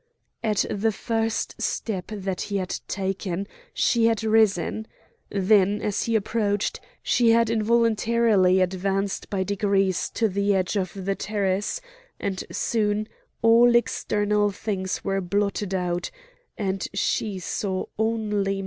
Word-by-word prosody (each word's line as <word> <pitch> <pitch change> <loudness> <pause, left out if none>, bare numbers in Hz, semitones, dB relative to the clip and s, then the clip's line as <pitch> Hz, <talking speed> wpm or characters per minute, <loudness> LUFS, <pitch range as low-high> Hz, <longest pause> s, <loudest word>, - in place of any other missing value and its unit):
At 210 -3 +1
the 215 +2 +1
first 225 +1 -2
step 195 -5 -2
that 195 -3 -4
he 200 - 0
had 185 -1 -3
taken 195 -1 -3 0.2
she 230 -2 +3
had 225 -1 +1
risen; 220 -1 +2 0.4
then, 200 0 +3
as 210 -2 -1
he 230 - 0
approached, 205 -1 0 0.2
she 240 -2 +3
had 230 0 +4
involuntarily 225 -3 +3
advanced 195 +2 -1
by 195 -2 0
degrees 195 -1 +1
to 225 - +2
the 200 0 +1
edge 185 +2 0
of 185 -3 -1
the 195 0 -2
terrace; 205 - -1 0.4
and 195 -2 -3
soon 215 -1 0 0.4
all 235 +1 +6
external 210 -3 +1
things 190 -2 -3
were 195 0 0
blotted 200 +1 -1
out, 175 -1 -1 0.5
and 195 -3 -2
she 200 0 0
saw 185 +1 -2
only 210 -3 0
Matho. - - -4
205 Hz, 130 wpm, -25 LUFS, 190-220 Hz, 0.5 s, all